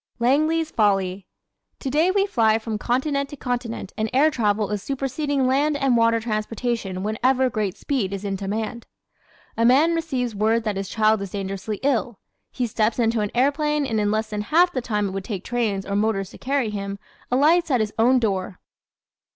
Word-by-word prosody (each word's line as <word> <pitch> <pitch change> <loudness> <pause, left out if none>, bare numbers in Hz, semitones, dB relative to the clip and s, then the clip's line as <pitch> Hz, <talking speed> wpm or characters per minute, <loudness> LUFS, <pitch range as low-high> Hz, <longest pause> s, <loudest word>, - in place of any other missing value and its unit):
"Langley's 310 +6 +2
Folly" 195 -3 +1 0.5
¶ - - -53
Today 300 +6 +1
we 395 +1 +2
fly 225 - +2
from 220 -1 -4
continent 280 +4 0
to - - -8
continent 245 -6 -4
and 220 0 -1
air 295 +4 +4
travel 210 -5 0
is 210 -2 -2
superseding 275 +2 -1
land 285 +3 +2
and 270 -3 +2
water 230 0 +3
transportation 215 -3 -3
whenever 255 +4 +1
great 210 -3 -2
speed 250 -10 -1
is 200 0 -5
in 195 -1 -1
demand. 215 +4 -4 0.7
A 230 - 0
man 280 +8 +5
receives 265 -8 -2
word 220 +3 +1
that 210 -2 -2
his 195 0 -4
child 215 -1 +2
is 200 - -5
dangerously 195 +1 -4
ill; 245 -5 0 0.3
he 250 - -2
steps 215 -1 0
into 230 -1 +1
an 210 -1 -1
airplane 290 +3 +1
and 225 -4 -1
in 205 -1 +1
less 215 +1 -1
than 210 0 -2
half 340 +11 +3
the 255 - -1
time 210 -4 -1
it - - -6
would 195 0 -4
take 195 -2 -5
trains 220 -5 -1
or 200 - -3
motors 200 -2 0
to - - -13
carry 265 -4 0
him, 200 -1 -4 0.3
alights 315 +7 +3
at 255 -4 +2
his 215 -1 -1
own 250 +3 +5
door. 195 -5 -1
230 Hz, 190 wpm, -23 LUFS, 210-270 Hz, 0.7 s, man